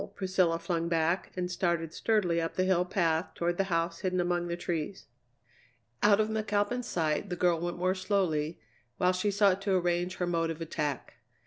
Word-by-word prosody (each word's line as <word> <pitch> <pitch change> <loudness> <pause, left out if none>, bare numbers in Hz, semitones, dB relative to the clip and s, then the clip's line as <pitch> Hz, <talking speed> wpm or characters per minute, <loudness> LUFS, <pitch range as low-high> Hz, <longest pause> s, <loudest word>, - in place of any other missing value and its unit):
Priscilla 185 -3 +1
flung 170 0 -2
back, 165 +2 0
and 180 0 -2
started 170 -3 -1
sturdily 180 -7 +1
up 165 - -3
the 185 - +2
hill 185 -1 +3
path 170 -2 0
toward 175 0 -1
the 195 - +1
house 170 -2 -1
hidden 185 -1 -1
among 175 0 0
the 170 0 -3
trees. 175 +1 -4 1.0
Out 205 0 +5
of 215 - +3
McAlpin's 220 +2 -1
sight, 160 +1 -1
the 180 - -2
girl 175 -2 +2
went 175 +1 -3
more 185 +1 +1
slowly, 185 -5 0 0.4
while 180 - +3
she 185 +3 0
sought 200 -1 +3
to 195 -1 +1
arrange 175 0 0
her 180 - -1
mode 165 -1 0
of 165 -1 -4
attack. 155 -4 -3
175 Hz, 185 wpm, -30 LUFS, 165-190 Hz, 1.0 s, Out